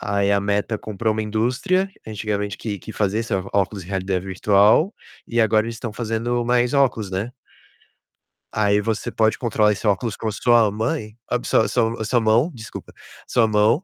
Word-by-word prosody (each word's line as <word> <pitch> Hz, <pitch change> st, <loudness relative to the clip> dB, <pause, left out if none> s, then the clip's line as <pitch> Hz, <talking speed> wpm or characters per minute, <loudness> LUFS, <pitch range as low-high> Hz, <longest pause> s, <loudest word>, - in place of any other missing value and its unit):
Aí 100 Hz, 0 st, 0 dB
a 100 Hz, 0 st, +3 dB
Meta 105 Hz, +2 st, -1 dB
comprou 110 Hz, +1 st, -2 dB
uma 110 Hz, 0 st, -2 dB
indústria, 130 Hz, -, 0 dB, 0.2 s
antigamente 105 Hz, -2 st, -3 dB
que 105 Hz, -3 st, -4 dB
que 110 Hz, -, -9 dB
fazia 105 Hz, +2 st, 0 dB, 0.3 s
óculos 100 Hz, 0 st, 0 dB
em -, -, -15 dB
realidade 95 Hz, -1 st, -2 dB
virtual. 105 Hz, -, +3 dB, 0.3 s
E 120 Hz, 0 st, 0 dB
agora 110 Hz, 0 st, +3 dB
eles 115 Hz, 0 st, -5 dB
estão 110 Hz, -1 st, -5 dB
fazendo 120 Hz, +2 st, -2 dB
mais 125 Hz, +2 st, +2 dB
óculos, 120 Hz, -8 st, +1 dB
né. 100 Hz, +6 st, -3 dB, 1.2 s
Aí 105 Hz, -1 st, +2 dB
você 110 Hz, 0 st, -2 dB
pode 110 Hz, -1 st, +2 dB
controlar 110 Hz, -3 st, +2 dB
esse 105 Hz, +1 st, -3 dB
óculos 105 Hz, +2 st, 0 dB
com 110 Hz, -, -5 dB
a -, -, 0 dB
sua 115 Hz, -1 st, +3 dB
mãe 110 Hz, +1 st, -3 dB, 0.3 s
sua 110 Hz, -, +2 dB
sua 115 Hz, -2 st, 0 dB
sua 120 Hz, +2 st, +2 dB
mão, 115 Hz, +9 st, +2 dB
desculpa, 115 Hz, -3 st, -10 dB, 0.3 s
sua 115 Hz, -2 st, +3 dB
mão. 110 Hz, -, +3 dB
110 Hz, 170 wpm, -22 LUFS, 105-120 Hz, 1.2 s, a